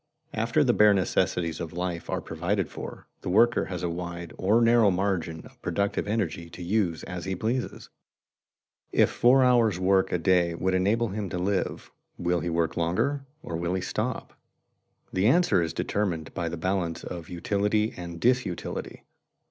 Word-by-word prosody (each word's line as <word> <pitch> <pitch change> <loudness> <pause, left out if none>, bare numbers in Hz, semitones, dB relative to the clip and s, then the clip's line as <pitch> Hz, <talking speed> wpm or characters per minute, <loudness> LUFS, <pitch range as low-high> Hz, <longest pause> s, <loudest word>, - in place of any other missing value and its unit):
_ - - -43
After - - +2
the - - +3
bare 105 -1 +6
necessities 85 -2 0
of 85 -1 -5
life 90 -1 -4
are - - -1
provided 90 +3 -2
for, - - -8 0.2
the - - -4
worker 115 +5 +4
has 90 -2 -5
a 90 - 0
wide 85 0 -6
or 105 +5 +3
narrow 115 -2 +5
margin 90 -4 -1
of - - -17
productive 100 0 -1
energy 95 -6 -2
to 90 - -9
use 90 -3 0
as 90 -1 -6
he 95 0 -2
pleases. 115 +6 -3 1.0
If - - +4
four 130 +2 +5
hours' 120 -6 +4
work 95 +1 +2
a - - +2
day 85 0 +2
would 95 +2 0
enable 105 +5 +2
him 100 0 -4
to 90 - -3
live, 95 +2 -2 0.3
will 90 0 0
he 85 - -3
work 85 -1 0
longer 135 +12 0 0.2
or 85 - -5
will 85 +2 -1
he 95 - -1
stop? - - -3 0.8
The 95 +3 +2
answer 170 - +4
is 80 -2 -1
determined 90 -6 -2
by 85 -3 -2
the 85 - -5
balance 90 -1 -1
of 85 -2 -7
utility 105 +4 0
and 85 -2 -7
disutility. 125 -6 -1
95 Hz, 170 wpm, -27 LUFS, 85-105 Hz, 1.0 s, bare